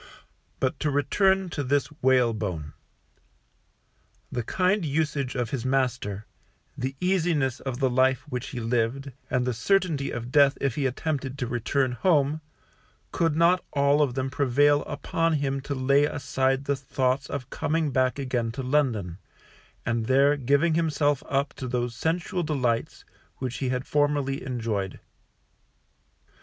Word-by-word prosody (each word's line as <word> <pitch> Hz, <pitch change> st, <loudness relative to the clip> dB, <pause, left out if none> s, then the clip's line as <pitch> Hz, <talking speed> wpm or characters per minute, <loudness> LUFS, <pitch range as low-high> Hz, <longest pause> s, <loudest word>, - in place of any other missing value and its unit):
But 135 Hz, +2 st, -1 dB
to 150 Hz, -, 0 dB
return 190 Hz, +7 st, +2 dB
to 145 Hz, -3 st, -3 dB
this 140 Hz, +2 st, +1 dB, 0.2 s
Whalebone. 110 Hz, -, +1 dB, 1.6 s
The 120 Hz, -, -1 dB
kind 185 Hz, -, +1 dB
usage 145 Hz, -3 st, -1 dB
of 120 Hz, -3 st, -2 dB
his 130 Hz, -4 st, -2 dB
master, 125 Hz, -6 st, -1 dB, 0.5 s
the 130 Hz, +2 st, -3 dB
easiness 165 Hz, -8 st, +1 dB
of 130 Hz, -3 st, -4 dB
the 135 Hz, 0 st, +2 dB
life 130 Hz, 0 st, +2 dB
which 125 Hz, +1 st, -4 dB
he 125 Hz, -, -5 dB
lived, 120 Hz, +4 st, -1 dB, 0.2 s
and 125 Hz, -1 st, +1 dB
the 125 Hz, -, 0 dB
certainty 160 Hz, -, +1 dB
of 120 Hz, +1 st, -5 dB
death 140 Hz, -1 st, +5 dB
if 140 Hz, -3 st, 0 dB
he 140 Hz, 0 st, 0 dB
attempted 135 Hz, 0 st, -3 dB
to 130 Hz, -, -2 dB
return 125 Hz, +2 st, 0 dB
home, 145 Hz, +3 st, +2 dB, 0.7 s
could 165 Hz, -3 st, +1 dB
not 170 Hz, +3 st, +4 dB
all 140 Hz, +1 st, +3 dB
of 135 Hz, -4 st, +1 dB
them 130 Hz, 0 st, -2 dB
prevail 145 Hz, +2 st, +3 dB
upon 165 Hz, +3 st, -1 dB
him 140 Hz, -2 st, -1 dB
to 140 Hz, +1 st, -4 dB
lay 140 Hz, +2 st, +3 dB
aside 135 Hz, -1 st, 0 dB
the 140 Hz, -, +1 dB
thoughts 130 Hz, 0 st, -1 dB
of 135 Hz, -3 st, -5 dB
coming 160 Hz, -2 st, 0 dB
back 130 Hz, 0 st, +1 dB
again 125 Hz, -4 st, -1 dB
to 135 Hz, +1 st, -4 dB
London, 120 Hz, -, 0 dB, 0.7 s
and 115 Hz, -1 st, -1 dB
there 140 Hz, +2 st, +4 dB
giving 145 Hz, +4 st, +2 dB
himself 150 Hz, -3 st, +1 dB
up 140 Hz, +1 st, 0 dB
to 130 Hz, -, -6 dB
those 120 Hz, -1 st, -1 dB
sensual 175 Hz, -, -1 dB
delights 125 Hz, -8 st, -1 dB, 0.3 s
which 125 Hz, -2 st, -4 dB
he 130 Hz, -, -2 dB
had 125 Hz, +1 st, -2 dB
formerly 145 Hz, -2 st, 0 dB
enjoyed. 110 Hz, -7 st, -3 dB
135 Hz, 145 wpm, -26 LUFS, 125-145 Hz, 1.6 s, death